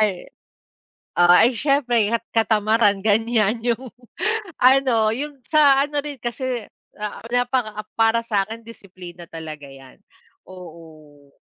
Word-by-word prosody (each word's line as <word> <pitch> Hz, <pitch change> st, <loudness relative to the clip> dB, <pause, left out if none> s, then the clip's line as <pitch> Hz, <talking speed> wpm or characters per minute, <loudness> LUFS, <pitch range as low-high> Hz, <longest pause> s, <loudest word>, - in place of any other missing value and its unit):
Ay 200 Hz, -4 st, -1 dB, 0.9 s
ah, 175 Hz, +5 st, +6 dB
ay 250 Hz, -, -3 dB
siyempre. 245 Hz, -5 st, +1 dB
kat 230 Hz, 0 st, -1 dB
katamaran 215 Hz, -2 st, +2 dB
ganyan 220 Hz, +1 st, +1 dB
yung 245 Hz, +2 st, -1 dB, 0.7 s
ano 250 Hz, -4 st, +3 dB
yung 285 Hz, +1 st, -6 dB
sa 285 Hz, -3 st, +4 dB
ano 290 Hz, -1 st, -3 dB
rin 290 Hz, -3 st, -7 dB
kasi, 240 Hz, -1 st, -4 dB, 0.3 s
ah, 210 Hz, +1 st, -6 dB
napaka 245 Hz, -4 st, -1 dB
para 225 Hz, 0 st, +3 dB
sa'kin 215 Hz, 0 st, -2 dB
disiplina 180 Hz, -6 st, -12 dB
talaga 155 Hz, -2 st, -8 dB
yan, 135 Hz, -1 st, -15 dB, 0.5 s
oo. 155 Hz, -5 st, -14 dB
220 Hz, 115 wpm, -21 LUFS, 185-245 Hz, 0.9 s, ah